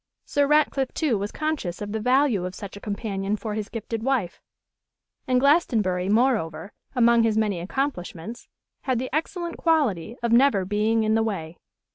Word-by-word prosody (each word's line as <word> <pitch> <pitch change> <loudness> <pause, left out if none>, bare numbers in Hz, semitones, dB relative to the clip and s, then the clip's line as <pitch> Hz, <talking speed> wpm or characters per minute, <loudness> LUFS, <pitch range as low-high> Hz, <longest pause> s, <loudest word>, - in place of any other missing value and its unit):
Sir 285 -1 +1
Ratcliffe, 285 -3 +2
too, 300 -8 +1
was 205 +1 -3
conscious 305 - -3
of 205 0 -5
the 220 - -2
value 250 -3 +2
of 180 0 -5
such 200 -2 -8
a - - -8
companion 200 -1 -2
for 215 0 -5
his 215 0 -4
gifted 230 -1 -5
wife. 235 -8 -1 0.9
And 255 -1 +3
Glastonbury, 220 - +2
moreover, 210 -7 +1 0.2
among 235 -1 +5
his 225 -1 +2
many 210 -5 +1
accomplishments, 195 - -4 0.4
had 260 -2 +1
the 255 +2 -4
excellent 340 +2 -3
quality 245 - +1
of 235 - 0
never 235 -6 +4
being 215 +3 +1
in 215 0 +1
the 225 - +3
way. 175 -7 -4
225 Hz, 165 wpm, -24 LUFS, 200-265 Hz, 0.9 s, among